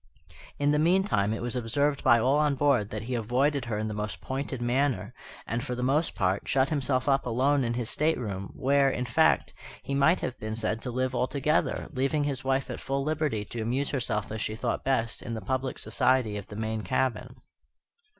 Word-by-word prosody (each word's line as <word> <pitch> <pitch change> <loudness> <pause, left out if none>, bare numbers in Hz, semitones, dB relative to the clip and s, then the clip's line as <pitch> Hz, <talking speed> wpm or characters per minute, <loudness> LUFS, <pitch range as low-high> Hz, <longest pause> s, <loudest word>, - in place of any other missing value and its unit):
In 145 0 +2
the 150 - +2
meantime 170 - +2
it 110 - -3
was 120 +1 -2
observed 140 +5 0
by 120 - +6
all 130 +6 +3
on 150 -2 +2
board 135 -7 +2
that 110 0 -5
he 125 +3 -4
avoided 125 +4 +1
her 115 -3 -2
in 110 +1 -2
the 110 - -3
most 105 0 -4
pointed 135 -1 -4
manner, 120 -3 0 0.3
and, 120 +2 -2
for 125 -3 -3
the 125 - -3
most 145 +6 +1
part, 95 +1 0
shut 135 0 +2
himself 135 -3 0
up 135 -2 +2
alone 135 +4 +2
in 120 -1 -1
his 120 -2 -2
stateroom, 115 -11 -1
where, 140 0 +3
in 125 -1 -2
fact, 115 - +2 0.3
he 140 - -4
might 140 +6 +3
have 130 - -4
been 110 0 -4
said 110 0 -2
to 125 - -4
live 130 +1 -1
altogether, 140 +4 0
leaving 135 +3 +1
his 140 -3 -2
wife 135 0 0
at - - -5
full 135 0 -2
liberty 150 -8 -1
to 115 +3 -5
amuse 130 +5 -1
herself 115 -7 -2
as 110 0 -4
she 110 - -2
thought 115 +1 -2
best 120 -4 0
in 115 - -5
the - - -3
public 130 +5 -2
society 130 -5 +1
of 100 -2 -6
the 105 - -9
main 110 0 -2
cabin. 125 +4 -1
130 Hz, 210 wpm, -28 LUFS, 110-140 Hz, 0.3 s, by